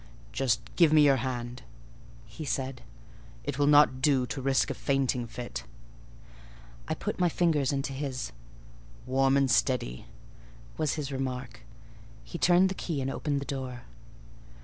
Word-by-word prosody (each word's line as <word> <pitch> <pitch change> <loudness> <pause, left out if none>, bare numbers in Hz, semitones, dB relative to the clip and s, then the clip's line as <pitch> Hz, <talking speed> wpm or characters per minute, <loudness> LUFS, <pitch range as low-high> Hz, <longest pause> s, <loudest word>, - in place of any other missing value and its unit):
"Just 130 -3 +1 0.2
give 170 -4 +6
me 155 -1 +6
your 140 -2 +5
hand," 120 0 -4 0.6
he 155 - -9
said: 130 -1 -3 0.6
"it 130 - -4
will 145 - +3
not 145 -3 +5
do 130 -2 +3
to 135 +3 -5
risk 135 0 +2
a - - -1
fainting 130 -3 0
fit." 120 - -6 1.2
I 160 - -1
put 205 +5 -4
my 180 -1 +3
fingers 155 -5 +2
into 135 -1 -2
his. 135 -2 -4 0.7
"Warm 135 +1 +3
and 135 -2 +2
steady," 110 - +1 0.7
was 155 -3 0
his 145 -3 -4
remark: 130 -3 -4 0.6
he 170 - -7
turned 180 +2 +5
the - - -2
key 165 -5 -3
and 135 0 -2
opened 140 0 -2
the - - -5
door. 130 -3 -5
135 Hz, 150 wpm, -29 LUFS, 125-145 Hz, 1.2 s, give